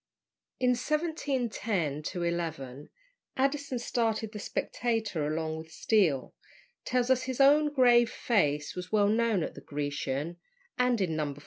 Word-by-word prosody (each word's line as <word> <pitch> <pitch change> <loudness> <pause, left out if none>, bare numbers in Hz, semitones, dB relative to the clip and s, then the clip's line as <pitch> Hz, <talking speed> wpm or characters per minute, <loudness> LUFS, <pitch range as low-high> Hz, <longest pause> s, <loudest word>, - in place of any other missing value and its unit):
In 250 -1 +3
1710 240 - -1 0.2
11 160 -5 -3 0.5
Addison, 275 0 0
starting 225 -2 -1
the 210 - -6
"Spectator 220 -8 -2
along 160 +1 -2
with 160 0 -10
Steele," 165 - +1 0.5
tells 250 0 +1
us 260 0 +2
his 260 0 -4
own 295 +2 +5
grave 240 -4 +5
face 150 - 0
was 180 0 -6
well 205 -1 +4
known 220 -4 +2
at - - -4
the - - -11
Grecian; 145 +2 -3 0.4
and 250 -2 +2
in 170 -4 0
No. 150 -2 -2
215 Hz, 130 wpm, -29 LUFS, 160-250 Hz, 0.5 s, own